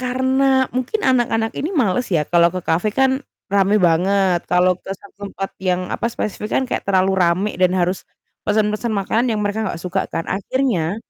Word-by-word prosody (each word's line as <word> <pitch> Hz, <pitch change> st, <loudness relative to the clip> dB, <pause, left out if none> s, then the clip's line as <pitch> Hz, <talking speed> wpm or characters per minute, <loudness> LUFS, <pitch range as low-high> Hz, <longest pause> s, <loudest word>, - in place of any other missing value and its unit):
karena 260 Hz, +1 st, +2 dB
mungkin 255 Hz, -, -2 dB
anak-anak 235 Hz, -4 st, +1 dB
ini 305 Hz, -, -2 dB
males 245 Hz, -2 st, +1 dB
ya 160 Hz, -5 st, +1 dB
kalau 170 Hz, +2 st, +4 dB
ke 185 Hz, +1 st, -4 dB
cafe 175 Hz, +6 st, +1 dB
kan 265 Hz, +2 st, +2 dB, 0.3 s
rame 200 Hz, +1 st, +3 dB
banget, 185 Hz, 0 st, +2 dB
kalau 180 Hz, +1 st, +4 dB
ke -, -, -15 dB
satu 200 Hz, 0 st, -11 dB
tempat 195 Hz, 0 st, -5 dB
yang, 185 Hz, -1 st, 0 dB
apa, -, -, -1 dB
spesifik 215 Hz, -2 st, -4 dB
kan 265 Hz, -, +1 dB
kayak 255 Hz, -, -3 dB
terlalu 190 Hz, 0 st, +3 dB
rame 180 Hz, +4 st, +2 dB
dan 185 Hz, 0 st, +3 dB
harus 180 Hz, +1 st, -1 dB, 0.4 s
pesan-pesan 215 Hz, +2 st, 0 dB
makanan 220 Hz, +5 st, 0 dB
yang -, -, -2 dB
mereka 215 Hz, +2 st, -1 dB
gak 170 Hz, -, -5 dB
suka 185 Hz, +1 st, -1 dB
kan. 165 Hz, -, -3 dB
Akhirnya 200 Hz, -4 st, -1 dB
200 Hz, 180 wpm, -20 LUFS, 185-245 Hz, 0.4 s, kalau